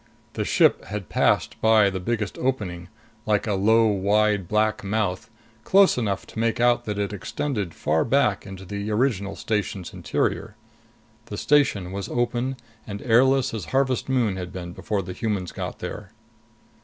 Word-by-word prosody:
The -, -, -2 dB
ship -, -, +3 dB
had 100 Hz, -2 st, -6 dB
passed -, -, +1 dB
by 110 Hz, -3 st, +5 dB
the 95 Hz, -, -3 dB
biggest 105 Hz, +1 st, -2 dB
opening, 95 Hz, -10 st, -2 dB, 0.4 s
like 105 Hz, -1 st, +2 dB
a 105 Hz, -, 0 dB
low 110 Hz, +4 st, +4 dB
wide 105 Hz, -1 st, +2 dB
black 110 Hz, +2 st, +1 dB
mouth, 100 Hz, -1 st, -1 dB, 0.3 s
close 195 Hz, 0 st, +5 dB
enough 105 Hz, -6 st, -2 dB
to -, -, -8 dB
make 115 Hz, 0 st, 0 dB
out 120 Hz, 0 st, +3 dB
that 105 Hz, -1 st, -3 dB
it 100 Hz, 0 st, -2 dB
extended 100 Hz, -, -3 dB
far 80 Hz, +1 st, +1 dB
back 130 Hz, -8 st, +2 dB
into 95 Hz, -1 st, -9 dB
the 100 Hz, +3 st, -4 dB
original 105 Hz, -4 st, 0 dB
station's 100 Hz, -4 st, -3 dB
interior. -, -, -2 dB, 0.7 s
The -, -, -6 dB
station 120 Hz, -11 st, +2 dB
was 100 Hz, 0 st, -5 dB
open 120 Hz, +2 st, -1 dB, 0.3 s
and 100 Hz, -1 st, -6 dB
airless 130 Hz, +2 st, +3 dB
as 105 Hz, -7 st, -4 dB
Harvest 130 Hz, -, 0 dB
Moon 120 Hz, -7 st, +1 dB
had 90 Hz, -1 st, -5 dB
been 90 Hz, -2 st, -7 dB
before 100 Hz, +1 st, -2 dB
the 90 Hz, +1 st, -6 dB
humans 100 Hz, -5 st, -2 dB
got -, -, -5 dB
there. -, -, -7 dB
105 Hz, 160 wpm, -24 LUFS, 95-120 Hz, 0.7 s, by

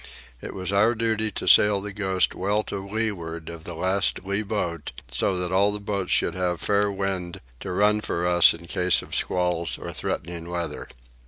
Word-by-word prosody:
It -, -, -7 dB
was 95 Hz, 0 st, -2 dB
our 105 Hz, +4 st, +4 dB
duty 110 Hz, -1 st, 0 dB
to -, -, -4 dB
sail 105 Hz, -1 st, +6 dB
the 105 Hz, 0 st, -6 dB
Ghost 95 Hz, -3 st, +1 dB
well 105 Hz, +3 st, 0 dB
to -, -, -5 dB
leeward 95 Hz, -6 st, -3 dB
of 85 Hz, -1 st, -9 dB
the 85 Hz, -, -5 dB
last 95 Hz, +4 st, +1 dB
lee 100 Hz, +2 st, -1 dB
boat, 90 Hz, -7 st, -3 dB, 0.2 s
so 95 Hz, -, 0 dB
that 90 Hz, 0 st, -2 dB
all 100 Hz, +2 st, +4 dB
the 105 Hz, -, -4 dB
boats 100 Hz, -2 st, -3 dB
should 85 Hz, -, +2 dB
have 90 Hz, -2 st, -1 dB
fair 100 Hz, +2 st, +1 dB
wind 95 Hz, -3 st, -3 dB, 0.2 s
to -, -, -5 dB
run 105 Hz, +3 st, +3 dB
for 85 Hz, -3 st, -1 dB
us 85 Hz, -1 st, +6 dB
in 85 Hz, +1 st, -8 dB
case 90 Hz, +1 st, +2 dB
of -, -, -11 dB
squalls 90 Hz, -2 st, 0 dB
or -, -, -7 dB
threatening 85 Hz, +1 st, -4 dB
weather. 85 Hz, -1 st, -3 dB
95 Hz, 190 wpm, -25 LUFS, 85-105 Hz, 0.2 s, sail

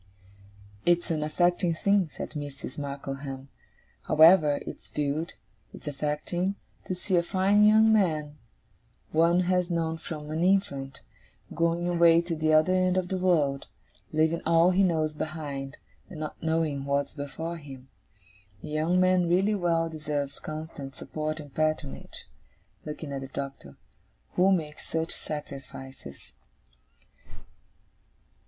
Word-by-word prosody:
'It's 175 Hz, 0 st, +2 dB
an 155 Hz, -2 st, 0 dB
affecting 175 Hz, +2 st, +1 dB
thing,' 200 Hz, 0 st, +2 dB
said -, -, -7 dB
Mrs. 145 Hz, -2 st, -6 dB
Markleham 140 Hz, -1 st, -6 dB, 0.6 s
'however 155 Hz, -2 st, +6 dB
it's -, -, -8 dB
viewed, 150 Hz, +3 st, -2 dB, 0.4 s
it's -, -, -12 dB
affecting, 150 Hz, +6 st, -2 dB, 0.3 s
to 185 Hz, -, -3 dB
see 180 Hz, 0 st, 0 dB
a -, -, +5 dB
fine 195 Hz, +4 st, +3 dB
young 220 Hz, +1 st, +6 dB
man 155 Hz, -7 st, +1 dB, 0.7 s
one 170 Hz, +3 st, +4 dB
has 180 Hz, 0 st, +1 dB
known 165 Hz, -1 st, -1 dB
from 150 Hz, -2 st, -7 dB
an 160 Hz, +2 st, -1 dB
infant, 140 Hz, -8 st, 0 dB, 0.5 s
going 170 Hz, +1 st, +1 dB
away 170 Hz, -1 st, +5 dB
to 170 Hz, 0 st, -2 dB
the 155 Hz, 0 st, +1 dB
other 155 Hz, +4 st, +5 dB
end 185 Hz, 0 st, +2 dB
of 180 Hz, -1 st, 0 dB
the 190 Hz, -, -1 dB
world, 150 Hz, -7 st, +1 dB, 0.4 s
leaving 160 Hz, +2 st, +2 dB
all 170 Hz, +2 st, +4 dB
he 185 Hz, +2 st, +3 dB
knows 160 Hz, -5 st, +2 dB
behind, 145 Hz, -3 st, -5 dB, 0.3 s
and 175 Hz, -6 st, -9 dB
not 155 Hz, -1 st, -6 dB
knowing 160 Hz, -4 st, 0 dB
what's 140 Hz, 0 st, 0 dB
before 160 Hz, +4 st, -5 dB
him. 135 Hz, -4 st, -11 dB, 0.8 s
A -, -, -6 dB
young 160 Hz, +4 st, +1 dB
man 185 Hz, -1 st, +3 dB
really 190 Hz, +5 st, +3 dB
well 170 Hz, -4 st, +1 dB
deserves 150 Hz, -3 st, -4 dB
constant 155 Hz, -3 st, -7 dB
support 155 Hz, 0 st, -4 dB
and 145 Hz, -3 st, -10 dB
patronage,' 155 Hz, -, -2 dB, 0.6 s
looking 150 Hz, -1 st, -6 dB
at 135 Hz, -, -3 dB
the 135 Hz, -, -6 dB
Doctor, 135 Hz, -, -7 dB, 0.6 s
'who 185 Hz, +2 st, +4 dB
makes 155 Hz, -5 st, -2 dB
such 160 Hz, 0 st, -2 dB
sacrifices. 135 Hz, -, -8 dB
160 Hz, 130 wpm, -28 LUFS, 145-175 Hz, 0.8 s, however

